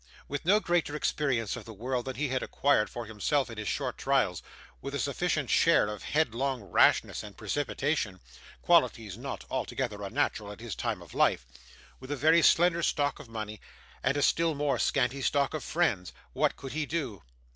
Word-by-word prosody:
With 145 +2 -4
no 200 +5 +5
greater 175 -6 0
experience 135 -8 0
of - - -8
the 110 -2 -10
world 125 +3 -2
than 130 -1 -4
he 140 +2 -1
had 130 0 0
acquired 140 -7 +2
for 120 -1 -6
himself 115 +5 0
in 115 - -7
his 105 - -4
short - - -2
trials; - - +1 0.4
with - - -5
a - - -1
sufficient - - -1
share - - +5
of 105 -1 -5
headlong 135 -4 0
rashness - - +3
and 105 -3 -11
precipitation 140 -8 -1 0.4
(qualities 120 - +3
not 130 +5 -6
altogether 125 -4 -2
unnatural 105 -1 -1
at 105 - -10
his 115 -1 -6
time - - -3
of - - -15
life); - - +2 0.5
with 130 - -11
a 145 - -1
very 160 +5 +5
slender 170 +1 +4
stock 145 -3 0
of 115 - -11
money, 110 -2 -6 0.4
and 140 - +1
a 145 - +1
still 165 -2 +2
more 145 -1 0
scanty 135 0 +1
stock 140 +2 +1
of 155 -4 -3
friends; 125 - 0 0.2
what - - +1
could 135 - -8
he 155 -1 -2
do? 135 - -3
135 Hz, 185 wpm, -29 LUFS, 110-150 Hz, 0.5 s, no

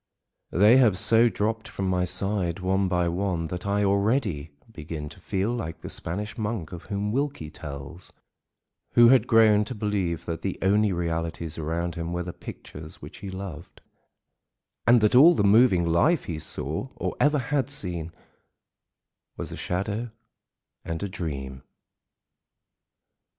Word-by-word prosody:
They 105 +7 +5
have 115 -8 +4
so 115 +5 +4
dropped 110 +2 -2
from 95 - -4
my 90 -1 +1
side 95 -1 -1
one 95 +1 +1
by 90 -1 +1
one 85 -1 -1
that 90 +3 -5
I 100 +1 +1
already, 100 - +1 0.2
begin 75 -4 -6
to - - -14
feel 100 +4 -1
like 105 -10 -5
the - - -7
Spanish 105 +7 -4
monk 105 -7 -3
of 90 -1 -9
whom 105 +1 -2
Wilkie 135 - -2
tells, 75 +4 -8 0.8
who 120 0 +7
had 125 -2 +5
grown 110 -2 +5
to 125 - -6
believe 100 -6 -2
that 85 -1 -4
the 95 - -3
only 105 +2 +3
realities 85 -2 -3
around 85 +2 -2
him 85 0 -4
were 90 0 -2
the 90 0 -6
pictures 75 +1 -10
which - - -11
he 100 - -7
loved, 95 -4 -8 1.1
and 120 -1 +6
that 105 - +3
all 155 +8 +8
the - - +1
moving 100 -3 +5
life 85 - +3
he 80 -3 -5
saw, 80 - -4
or - - -3
ever 150 0 +4
had 135 +1 -1
seen, 90 - -3 1.3
was - - -5
a - - -5
shadow 100 +6 -3 0.7
and 80 +2 -4
a 100 - -3
dream. 70 -7 -5
95 Hz, 150 wpm, -26 LUFS, 85-110 Hz, 1.3 s, all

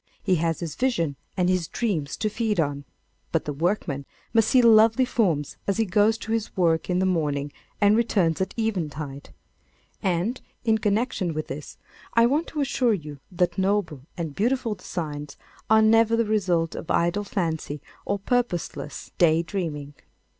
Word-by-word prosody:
He 185 -3 +2
has 165 +1 -1
his 165 -3 -4
visions 220 - 0 0.2
and 180 -1 +2
his 180 -3 +1
dreams 165 -12 -2
to 215 - 0
feed 215 -2 -1
on. 145 -2 -1 0.5
But 165 - 0
the 150 - -3
workman 150 -3 -1 0.3
must 225 -2 +4
see 255 -2 +5
lovely 225 +2 +6
forms 175 - 0
as 200 - +1
he 225 - +2
goes 210 +3 +3
to 225 - -7
his 225 -2 -2
work 165 -2 +2
in 180 - +1
the 190 - +2
morning 145 -5 0 0.3
and 205 0 +5
returns 195 -8 +2
at 190 - -2
eventide. 155 - -3 0.7
And, 190 +6 0 0.2
in 220 -1 +3
connection 205 -5 0
with 155 - -4
this, 140 +2 -7 0.4
I 230 0 +6
want 290 +7 +1
to 300 - -3
assure 250 -4 +2
you 150 -5 -8
that 175 0 0
noble 190 -7 0 0.2
and 165 -4 -3
beautiful 235 - 0
designs 150 -7 -6 0.3
are 220 0 +6
never 225 +1 +5
the 230 0 +2
result 180 -6 +1
of - - -7
idle 175 +5 +1
fancy 165 -7 -2 0.2
or 200 - -1
purposeless 200 - -2
day 165 -1 +4
dreaming. 155 -6 -4
185 Hz, 165 wpm, -25 LUFS, 160-220 Hz, 0.7 s, lovely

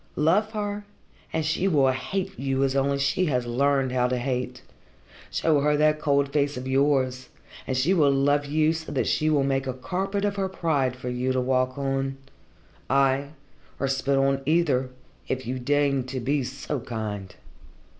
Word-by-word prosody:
Love 195 +9 +2
her, 205 -1 -3 0.5
and 160 -1 -1
she 160 +5 +1
will 140 -7 +4
hate 190 +9 -3
you 135 0 0
as 135 0 +1
only 140 +1 +2
she 140 +7 +1
has 125 -6 0
learned 135 +2 +1
how 125 -1 +2
to 125 0 -1
hate. 125 0 -3 0.7
Show 155 -3 +2
her 150 +1 +2
that 155 0 +3
cold 140 -2 +1
face 145 -1 +1
of 130 +1 -5
yours, 130 -2 +1 0.4
and 130 - -1
she 155 +9 +3
will 155 -6 +4
love 145 +1 +2
you 155 +2 +2
so 160 0 -6
that - - 0
she 155 0 +1
will 145 -3 +3
make 135 0 0
a 130 - -1
carpet 195 +8 -2
of 205 0 -1
her 190 -1 0
pride 145 -9 0
for 125 0 -6
you 125 +1 -1
to 130 - +1
walk 130 0 0
on 135 -1 -1 0.7
ay, 135 0 +2 0.5
or 135 - 0
spit 135 +1 0
on 135 0 +2
either, 145 -6 +2 0.4
if 130 -1 -3
you 130 +2 -3
deign 140 0 +1
to 130 0 -4
be 135 +3 0
so 135 +3 -4
kind. 105 -5 -5
140 Hz, 180 wpm, -25 LUFS, 130-150 Hz, 0.7 s, will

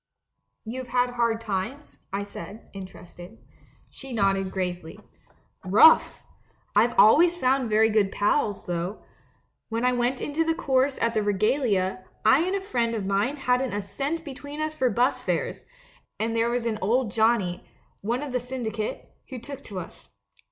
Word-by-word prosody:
" - - -53
'You've 250 +3 -5
had 245 0 +1
hard 235 -2 0
times?' 225 +6 -5
I 200 +1 -2
said, 200 +2 -10
interested. 185 +1 -11 0.5
"She 270 -2 -10
nodded 195 -3 +1
gravely. 180 -3 -4 0.6
'Rough! 210 +12 +5 0.5
I've 230 +4 +3
always 335 - +6
found 260 -4 +1
very 220 +1 +4
good 210 -2 +2
pals, 205 -1 0
though. 175 +3 -4 0.7
When 230 +2 -1
I 250 - +3
went 245 +1 0
into 300 +3 -1
the 325 0 0
chorus 270 -4 +1
at 230 0 +1
the 215 - +1
Regalia, 205 -2 +1 0.2
I 220 +6 +6
and 380 - 0
a 395 - -2
friend 235 -11 -1
of 210 -3 -3
mine 200 +8 0
hadn't 250 -2 0
a 205 - -1
cent 290 - -3
between 285 +1 -8
us 310 0 -2
for 260 -4 +1
bus 240 +4 +1
fares; - - -2 0.5
and 225 +1 -1
there 230 +1 +2
was 240 0 -1
an 220 -2 -1
old 230 +3 +1
Johnnie 220 -5 +1 0.2
— - - -40
one 235 +7 -1
of 290 - -5
the 250 - 0
syndicate 230 -4 -4
— - - -37
who 260 - -6
took 275 +3 -9
to 195 -3 -6
us. 175 - -11
230 Hz, 170 wpm, -26 LUFS, 205-260 Hz, 0.7 s, always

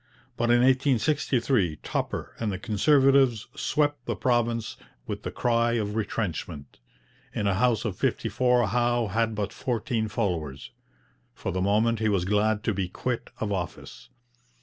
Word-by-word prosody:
But 120 - 0
in 120 0 +5
1863 130 - +2
Tupper - - -3
and 110 -2 -1
the 95 - -3
Conservatives 135 +2 +3
swept 145 -4 0
the - - -1
province 120 -2 0 0.3
with - - -5
the - - -4
cry 115 -1 +1
of 105 -3 -1
retrenchment. 85 - -4 0.6
In 105 - -1
a 100 - +2
house 115 +2 +1
of 100 -5 -3
fifty - - 0
four 125 -1 +2
Howe 120 0 +1
had 110 +2 0
but 105 -1 -3
fourteen 115 -2 -2
followers. 85 - -3 0.6
For - - -4
the 95 - -2
moment 110 +4 +2
he 110 -1 +1
was 95 -4 +1
glad 105 +2 +1
to 110 - 0
be 95 -2 -2
quit 125 +5 -3
of 105 -2 -2
office. 90 -4 -5
115 Hz, 150 wpm, -26 LUFS, 100-120 Hz, 0.6 s, in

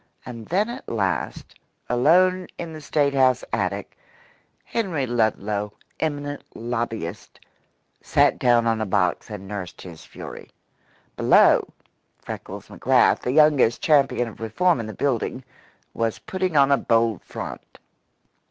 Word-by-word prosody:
And 115 -3 -8
then 200 +5 +1
at 240 +2 -8
last, 100 -5 -2 0.3
alone 180 +9 +3
in 165 -2 -6
the 155 - -8
State 145 -1 +1
house 130 -2 +3
attic, - - -2 0.7
Henry 180 - -2
Ludlow, 105 -3 -1 0.3
eminent 145 -2 -3
lobbyist, 115 -6 -4 0.6
sat - - +2
down 120 -1 +3
on 115 -1 +1
a - - 0
box 95 -1 0
and 100 -2 -8
nursed 95 -3 -7
his 85 -3 -11
fury. - - -10 0.7
Below, - - +5 0.5
Freckles - - -8
McGrath, - - +3
the 125 - -2
youngest 145 -5 +4
champion 140 -5 +3
of 110 - -11
reform 145 +10 +1
in 115 - -4
the 110 - -6
building, 130 0 -1 0.5
was 115 -1 -1
putting 185 -4 -2
on 140 0 +5
a 140 - +5
bold 115 -5 +1
front. - - -8
120 Hz, 130 wpm, -23 LUFS, 110-150 Hz, 0.7 s, Below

